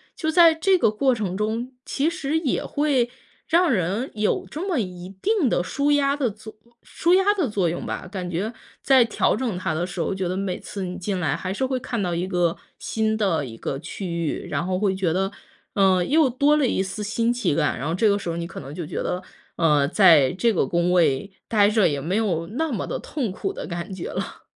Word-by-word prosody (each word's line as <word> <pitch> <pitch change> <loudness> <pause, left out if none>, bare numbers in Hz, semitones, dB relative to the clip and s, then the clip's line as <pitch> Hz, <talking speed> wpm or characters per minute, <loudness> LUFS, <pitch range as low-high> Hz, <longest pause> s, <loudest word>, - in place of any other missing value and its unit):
就 315 - -2
在 330 0 +7
这 370 +4 +3
个 225 - +3
过 260 +4 +2
程 200 -5 -3
中， 220 +5 -2
其 280 - 0
实 320 -3 -1
也 310 -6 -1
会 280 -5 +1 0.4
让 340 0 +3
人 205 +5 -1
有 210 -1 0
这 320 +6 -5
么 360 -6 0
一 180 -3 -5
定 405 - +2
的 175 - +1
舒 280 +9 0
压 280 -1 +3
的 275 -5 0
作 215 +1 -11 0.3
舒 345 +2 +2
压 385 +2 +4
的 345 - 0
作 195 -4 0
用 170 +1 -3
吧。 - - -5
感 185 -3 -4
觉 190 +7 -2 0.3
在 265 -2 +6
调 230 - +1
整 230 -5 -2
它 185 - -2
的 175 +3 -1
时 180 - -7
候， 170 - 0
觉 190 -1 -2
得 185 +1 -2
每 190 -2 -2
次 200 - -6
你 180 0 -5
进 190 +1 -2
来 155 -5 0
还 185 - -4
是 205 +7 -1
会 260 -1 -1
看 240 -1 -4
到 180 -3 -1
一 175 +2 -2
个 175 -2 +1 0.2
新 220 0 -1
的 190 -8 +1
一 115 -4 -8
个 135 +4 -4
区 165 +5 -7
域， 170 -3 -3
然 - - -2
后 185 0 -1
会 195 -1 +1
觉 185 -3 0
得， 190 +3 0 0.4
嗯， 190 -3 +3
又 305 -2 +4
多 285 +4 +3
了 285 -4 +2
一 190 - 0
丝 195 +2 -5
新 230 +3 0
奇 245 -11 0
感， - - 0
然 140 - -3
后 165 - -1
这 215 +4 +3
个 200 0 +3
时 180 - -5
候 165 - -2
你 170 - -3
可 - - -8
能 135 - -9
就 175 -2 -4
觉 - - -6
得， 180 - -2 0.4
嗯， 150 -4 +3
在 165 -9 +6
这 230 +5 +2
个 - - +1
工 175 +1 +1
位 170 0 +2 0.2
呆 205 -2 +4
着 215 -5 +4
也 145 -2 -2
没 165 +7 -2
有 180 -7 0
那 305 +8 -2
么 220 - -2
的 - - -4
痛 260 -9 -3
苦 385 - -3
的 - - -6
感 175 +1 -5
觉 185 -2 -5
了。 - - -5
200 Hz, 255 characters per minute, -23 LUFS, 175-260 Hz, 0.4 s, 在